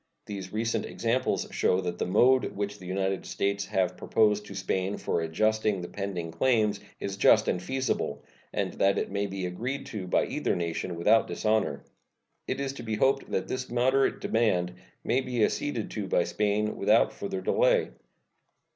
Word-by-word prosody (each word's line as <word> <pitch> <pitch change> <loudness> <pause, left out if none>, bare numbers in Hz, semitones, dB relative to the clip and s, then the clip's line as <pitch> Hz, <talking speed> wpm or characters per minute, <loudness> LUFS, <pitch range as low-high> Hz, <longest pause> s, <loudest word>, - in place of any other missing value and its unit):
These 95 -3 -6
recent 115 +2 -1
examples 120 +3 0
show 90 - +2
that 90 -1 -4
the - - -1
mode 125 +7 +4
which 100 0 -3
the 90 - -10
United 95 +1 -1
States 100 0 -1
have 90 -1 0
proposed 105 0 +2
to 100 - -9
Spain 95 +1 -1
for 85 - -1
adjusting 110 +5 +1
the 90 - -5
pending 95 -5 -4
claims 105 +1 +2 0.2
is 100 0 -4
just - - +5
and 90 - 0
feasible, 130 +6 -2 0.3
and - - -2
that 100 0 +2
it - - -2
may 100 0 -1
be 95 -1 -4
agreed 125 +10 -4
to 100 -4 -4
by - - +2
either - - -1
nation 85 +1 -3
without 105 +7 +4
dishonor. 105 -10 0 0.6
It - - -2
is 140 -1 -2
to - - -8
be 110 -1 -2
hoped 135 +5 +2
that - - -1
this 130 0 -4
moderate 130 +3 +2
demand 90 -6 +1 0.3
may 130 - +1
be 125 -3 0
acceded 120 -8 -2
to 105 -3 -4
by 90 - +2
Spain 105 +3 0
without 105 +3 +3
further 95 -1 -4
delay. 95 - +2
105 Hz, 175 wpm, -28 LUFS, 95-115 Hz, 0.6 s, just